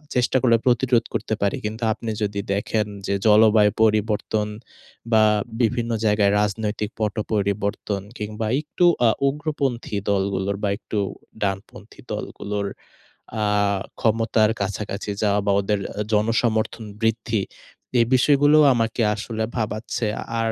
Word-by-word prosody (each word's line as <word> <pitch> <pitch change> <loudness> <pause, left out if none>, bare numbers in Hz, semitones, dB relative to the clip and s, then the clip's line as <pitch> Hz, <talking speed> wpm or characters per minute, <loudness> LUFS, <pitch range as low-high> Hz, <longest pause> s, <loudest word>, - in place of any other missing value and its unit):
চেষ্টা 125 +1 +2
করলে 115 -3 +4
প্রতিরোধ 120 -1 +3
করতে - - -2
পারি। 100 -1 +1
কিন্তু 110 +2 -4
আপনি 115 0 -5
যদি 100 0 -2
দেখেন 105 +2 0 0.2
যে, - - 0
জলবায়ু 105 -1 +6
পরিবর্তন 105 0 +1 0.7
বা 110 -1 +6 0.4
বিভিন্ন 120 0 0
জায়গায় 105 -1 +3
রাজনৈতিক 105 0 -2
পট 105 -2 -1 0.2
পরিবর্তন 100 0 -1 0.2
কিংবা 105 +1 -4
একটু 155 +3 0 0.2
আ - - +6 0.2
উগ্রপন্থী 140 -6 -2
দলগুলোর 100 0 0
বা 100 - +2
একটু 110 -1 -4 0.4
ডানপন্থী 95 0 -5
দলগুলোর 100 0 -4 0.8
আ - - +2 0.5
ক্ষমতার 110 -1 +2
কাছাকাছি 100 +1 -3
যাওয়া 105 -1 +2
বা 100 - +3
ওদের 105 +1 0
অ্যা 105 - -3
জনসমর্থন 110 +1 +1 0.2
বৃদ্ধি, 110 -1 0 0.6
এ - - +6
বিষয়গুলো 145 +3 +4 0.2
আমাকে 115 0 0
আসলে 110 +1 -4
ভাবাচ্ছে। 110 +2 -2 0.4
আর 115 0 0
110 Hz, 125 wpm, -23 LUFS, 105-115 Hz, 0.8 s, জলবায়ু